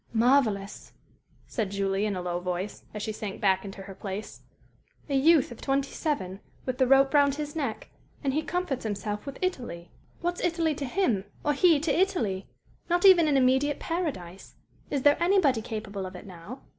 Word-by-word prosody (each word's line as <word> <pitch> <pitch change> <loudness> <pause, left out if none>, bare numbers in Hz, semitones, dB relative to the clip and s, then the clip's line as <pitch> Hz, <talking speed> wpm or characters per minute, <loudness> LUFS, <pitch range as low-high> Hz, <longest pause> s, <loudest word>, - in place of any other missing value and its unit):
"Marvellous!" 225 -4 +1 0.5
said 220 -6 -2
Julie, 195 +1 0
in 205 - -2
a 180 - -4
low 175 -1 -2
voice, 180 +2 -4
as 210 -1 -6
she 220 - -2
sank 210 -2 -6
back 190 -2 +2
into 195 -1 -8
her 195 0 -9
place. 195 +2 -7 0.7
"A 285 - -3
youth 285 0 +4
of 240 - -10
twenty 275 0 0
seven, 195 - -2 0.3
with 255 0 -3
the 260 - +4
rope 270 +1 +5
round 285 -1 +4
his 295 0 -5
neck, 270 -9 -4 0.3
and 270 -2 0
he 305 - +1
comforts 345 -5 -2
himself 210 +1 -4
with 275 - -6
'Italy.' 205 - -3 0.3
What's 350 0 -2
'Italy' 335 -2 +1
to 285 -1 -4
him, 245 - 0 0.2
or 295 - +3
he 325 +1 +5
to 300 -1 0
'Italy'?" 280 - 0 0.4
Not 350 +3 +2
even 355 -4 +8
an 285 -2 +3
immediate 265 +3 +2
paradise. 260 - -4 0.3
"Is 280 -3 -1
there 290 +3 +4
anybody 340 - +3
capable 210 -4 -5
of 185 - -10
it 180 - -10
now?" 190 +7 -10
255 Hz, 180 wpm, -27 LUFS, 200-295 Hz, 0.7 s, even